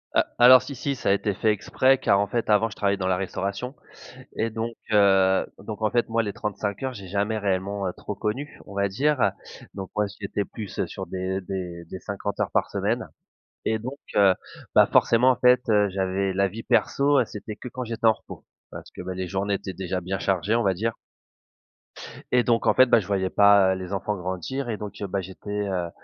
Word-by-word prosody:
Heu, - - +6 0.2
alors 125 +1 +9
si 140 - -7
si. 140 +1 -2
Ça 120 - -2
a - - +5
été 100 0 0
fait 110 +3 +2
exprès 130 +5 +2
car 100 -5 +3
en 100 - +1
fait 120 -2 -2
avant 105 +2 +4
je 100 - -11
travaillais 100 -1 +1
dans 95 -1 -2
la 90 -1 +2
restauration 100 +7 -4 0.6
et 115 - 0
donc 115 +1 -4 0.2
heu, 95 -2 +4
donc 105 +2 -7
en 110 - +1
fait 120 -1 +1
moi 115 0 +1
les 100 -2 -4
trente-cinq 100 0 -4
heures 130 -1 -2
j'ai 100 -4 -9
jamais 100 +4 -1
réellement, 100 0 -1
heu, 90 - -3
trop 105 - -6
connu 115 +9 -4
on - - -11
va 100 0 +1
dire, 130 0 +1 0.4
donc 95 -2 -6
moi 105 0 +2
j'étais 100 0 -2
plus 105 -5 -5
sur - - -6
des 95 +1 -3
des 90 -2 -6
des 95 +3 -8
50 100 0 -5
heures - - 0
par - - +1
semaine - - -1 0.6
et 110 0 +1
donc 130 +5 -6 0.2
heu, 100 -2 +6 0.4
bah, - - +7
forcément 125 +3 +5
en 125 - -1
fait. 125 0 +5
Heu, 105 -1 +4
j'avais 95 0 -1
la 100 +1 +2
vie 115 +3 -8
perso, 140 -1 +3
c'était 105 0 -8
que 125 - -9
quand 125 +1 -5
j'étais 115 0 -4
en 110 - +8
repos - - -12 0.3
parce - - -9
que, - - -9
bah, 95 +1 -5
les 90 0 -4
journées 100 +2 -1
étaient 95 - -5
déjà 95 0 -3
bien 95 +2 -3
chargées 100 +4 0
on 120 - +2
va 95 -1 +2
dire 110 +5 -2 1.4
et 125 -1 +4
donc 115 -1 +1
en - - +5
fait, 130 - +7
bah, 120 - +5
je 95 - -7
voyais 95 -2 0
pas, 100 -2 +5
heu, 95 - -4
les 90 0 -7
enfants 105 +2 -2
grandir 95 +9 -4
et 110 - -2
donc 105 -1 -7
heu, 100 - -2
bah, 95 0 -2
j'étais, 105 +2 -5
heu 90 -3 -2
100 Hz, 225 wpm, -25 LUFS, 95-115 Hz, 1.4 s, alors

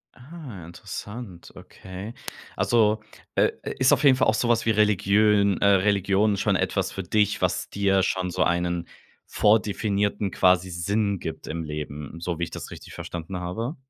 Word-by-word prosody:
Ah, 130 - -10
interessant, 95 +3 -8
okay. 95 +4 -9 0.4
Also, 110 -2 +2 0.3
äh, - - +3
i - - -3
ist 130 0 +4
auf - - +2
jeden 135 -2 +7
Fall 130 - +2
auch 110 - +3
so 120 - 0
was 115 -1 +2
wie - - +1
Religiön 105 -1 +3
äh, - - +1
Religion 100 +1 +3
schon 105 0 +1
etwas - - 0
für 95 - -5
dich, 105 +3 +1
was - - 0
dir 95 -1 +2
schon 95 -1 -1
so 90 +1 +1
einen 85 0 -1 0.4
vordefinierten 105 -1 +1
quasi 90 0 +3
Sinn 100 +4 -1
gibt 80 -1 -6
im 80 +1 -4
Leben, 75 0 -6
so 85 0 -3
wie 85 - -2
ich 85 - -4
das - - -7
richtig - - -11
verstanden 85 +2 -6
habe? 110 - -4
100 Hz, 170 wpm, -25 LUFS, 90-110 Hz, 0.4 s, jeden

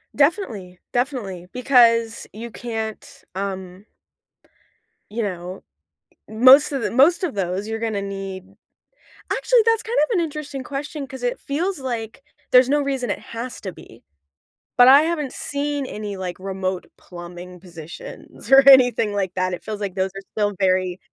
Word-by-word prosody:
Definitely. 235 - 0
Definitely. 240 -9 -3
Because 235 -3 +3
you 230 +2 -8
can't, 220 -2 -6
um... 190 0 -5 1.3
you 230 +3 -3
know, 180 -1 -5 0.7
most 260 +7 +6
of 270 -3 -2
the - - -1
most 300 +9 +4
of 315 - -2
those, 195 +2 -2
you're 225 - -3
gonna 220 -3 -2
need 195 -1 -6 0.9
actually, - - +3
that's 455 -1 +2
kind 465 +1 -3
of 305 - -1
an - - +2
interesting 295 -4 -5
question 280 +1 -5
'cause 265 -1 -9
it 245 - -1
feels 330 +4 -2
like 240 -1 -5 0.3
there's 250 0 +6
no 290 +1 +2
reason 270 -3 -2
it - - -2
has 240 +2 -7
to 190 - -5
be. - - -16 0.7
But 245 0 +8
I 280 +3 +8
haven't 310 -5 -2
seen 285 0 -3
any, 210 -5 -6
like, 180 -1 -5
remote 190 -1 -3
plumbing 175 0 -10
positions 175 - -11
or 270 0 +7
anything 245 -5 +6
like 195 -3 -2
that, 185 0 0
it 180 - -6
feels 215 -1 -5
like 195 -2 -4
those 190 0 -1
are 195 - -6
still 205 -1 0
very 185 -1 +1
225 Hz, 155 wpm, -22 LUFS, 190-275 Hz, 1.3 s, But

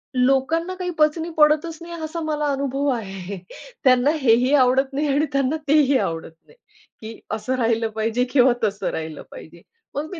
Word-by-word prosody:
लोकांना 270 +8 +1
काही 365 -1 -4
पचनी 320 +2 +2
पडतच 305 +2 +3
नाही 340 0 -9
असा 325 +2 -4
मला 300 -1 -2
अनुभव 275 +1 -2
आहे. 195 -5 -4 0.5
त्यांना 255 +2 +4
हेही 250 +3 +3
आवडत 265 0 +3
नाही 295 +2 -1
आणि 285 +2 +2
त्यांना 275 +3 +1
तेही 285 -2 +4
आवडत 165 -4 -3 0.2
नाही, - - -21 0.5
की 220 +1 -9
असं 220 +4 -2
राहिलं 225 -2 0
पाहिजे 225 +3 0
किंवा 255 -2 +5
तसं 200 0 -1
राहिलं 160 -2 -6
पाहिजे. 170 +1 -12 0.3
मग 300 +2 -3
मी 355 - -7
265 Hz, 165 wpm, -22 LUFS, 225-300 Hz, 0.5 s, किंवा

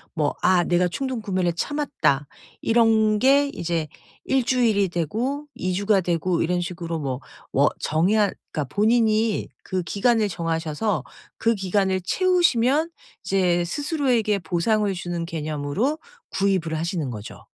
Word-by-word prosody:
뭐 150 -3 0
'아 185 -1 +4
내가 180 +1 +2
충동구매를 195 -6 -2
참았다.' 170 - 0 0.3
이런 220 -2 +3
게 280 +3 +4
이제 165 -2 -2 0.4
1 265 -1 +2
주일이 230 -6 +2
되고 225 - -2
2 185 +1 -2
주가 200 +1 +2
되고 175 0 0
이런 175 +2 0
식으로 170 -2 -4
뭐 135 -3 -3 0.3
워 140 +2 +4
정의할 195 +7 +2 0.2
그러니까 145 -4 -4
본인이 220 0 +2 0.2
그 185 -1 -2
기간을 220 +4 +2
정하셔서 165 - -2 0.3
그 230 0 +2
기간을 190 -1 0
채우시면 330 - +2 0.3
이제 180 -2 +2
스스로에게 250 - 0
보상을 195 +5 0
주는 175 -2 -4
개념으로 155 - -2 0.3
구입을 190 -5 0
하시는 165 -3 -2
거죠. 105 -3 -9
190 Hz, 285 characters per minute, -23 LUFS, 170-225 Hz, 0.4 s, 아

